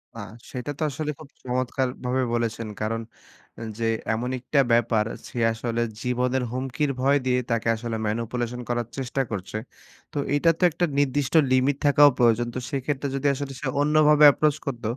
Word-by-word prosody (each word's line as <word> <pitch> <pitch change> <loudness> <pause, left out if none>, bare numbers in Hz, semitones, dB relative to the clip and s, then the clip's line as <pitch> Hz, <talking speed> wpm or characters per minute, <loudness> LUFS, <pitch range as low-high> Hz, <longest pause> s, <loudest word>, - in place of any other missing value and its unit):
না, - - -8 0.3
সেটা 125 +3 -4
তো - - 0
আসলে 150 +2 -3
খুব 155 -3 -12
চমৎকারভাবে 130 0 -1
বলেছেন। 115 -1 -2
কারন 115 +1 -1 0.8
যে, 115 -1 -1 0.3
এমন 120 +3 -2
একটা 130 +4 0
ব্যাপার, 115 -2 +2 0.2
সে - - -10 0.2
আসলে 115 +1 -2 0.2
জীবনের 125 +1 0
হুমকির 135 +3 -1
ভয় 140 +2 +4
দিয়ে 125 0 +2
তাকে 115 -1 0
আসলে 115 0 -4
manipulation 115 +2 -3
করার 120 -1 -1
চেষ্টা 135 0 -2
করছে। 100 +1 -4 0.6
তো - - -5 0.2
এটা 165 +3 +3
তো - - -1
একটা 170 +3 0
নির্দিষ্ট 140 0 0 0.2
limit 130 +2 +3
থাকাও 145 0 +7
প্রয়োজন। 120 0 +3
তো - - -1
সেক্ষেত্রে 140 0 -2
যদি 135 +1 0
আসলে 140 0 -5
সে 150 - -3
অন্যভাবে 150 0 +4
approach 150 0 +1
করত, 130 -4 -4
125 Hz, 160 wpm, -25 LUFS, 120-145 Hz, 0.8 s, থাকাও